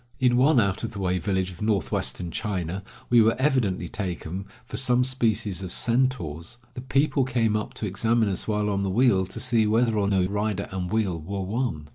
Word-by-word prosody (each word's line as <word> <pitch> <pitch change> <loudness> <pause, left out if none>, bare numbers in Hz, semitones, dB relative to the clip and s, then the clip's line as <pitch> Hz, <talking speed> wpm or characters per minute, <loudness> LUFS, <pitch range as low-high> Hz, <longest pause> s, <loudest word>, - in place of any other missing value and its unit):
In 125 -2 +3
one 135 +2 +5
out 100 -1 0
of 115 - -4
the 100 - -6
way 90 -1 0
village 95 0 -1
of 90 - -13
northwestern 100 -4 -1
China, 95 -1 -3 0.3
we 120 -1 +7
were 110 +1 +4
evidently 125 -10 +1
taken 95 0 -5 0.2
for - - -8
some 125 -1 +3
species 110 -7 0
of 95 -2 -5
centaurs; 115 - 0 0.2
the 125 - -7
people 135 +2 +1
came 120 -4 +1
up 105 - -3
to - - -4
examine 110 +3 +1
us 95 -2 -2
while 105 -1 0
on 100 0 0
the 100 - -1
wheel 100 -3 +3
to - - -7
see 110 -2 +2
whether 110 0 +2
or 100 - +1
no 95 -2 +2
rider 100 0 -2
and 90 -1 -4
wheel 100 -7 0
were 95 +5 -4
one. 100 - -3
105 Hz, 200 wpm, -25 LUFS, 95-120 Hz, 0.3 s, we